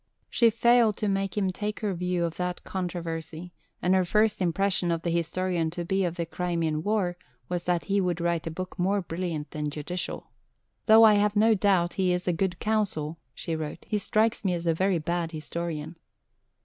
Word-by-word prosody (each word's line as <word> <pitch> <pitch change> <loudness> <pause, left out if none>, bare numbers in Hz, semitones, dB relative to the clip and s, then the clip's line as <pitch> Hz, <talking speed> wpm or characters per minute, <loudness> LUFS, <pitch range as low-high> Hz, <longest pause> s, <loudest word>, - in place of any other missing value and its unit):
She 235 -2 +5
failed 230 -1 +4
to 210 - -1
make 195 0 -1
him 195 -2 +1
take 210 +3 -4
her 205 -3 0
view 180 0 -1
of 165 - -4
that 180 0 -3
controversy, 170 -2 -5 0.3
and 180 - +3
her 190 -1 +4
first 210 +3 +2
impression 185 0 +1
of 165 -1 -1
the 170 - 0
historian 170 0 0
to 175 +1 -4
be 190 +2 +1
of 170 -1 -2
the 170 -2 -2
Crimean 165 -3 -1
War 190 -2 0 0.3
was 175 -1 -2
that 175 -1 0
he 200 0 +1
would 180 -2 -1
write 170 -1 -1
a - - 0
book 185 +3 -6
more 195 +2 +1
brilliant 165 -3 -4
than 150 -1 -3
judicial. 155 +5 -5 0.6
"Though 220 0 +8
I 220 -1 +8
have 205 0 +2
no 220 +2 +5
doubt 190 -4 +2
he 180 -1 +3
is 180 +1 -3
a 180 - +3
good 180 +1 -1
counsel," 185 -8 -1 0.2
she 165 - -3
wrote, 155 -1 -6
"he 210 - 0
strikes 220 +3 +1
me 185 -3 +1
as 170 0 -5
a 165 - +3
very 185 +2 +1
bad 170 +1 -2
historian." 160 0 -5
180 Hz, 200 wpm, -27 LUFS, 170-200 Hz, 0.6 s, Though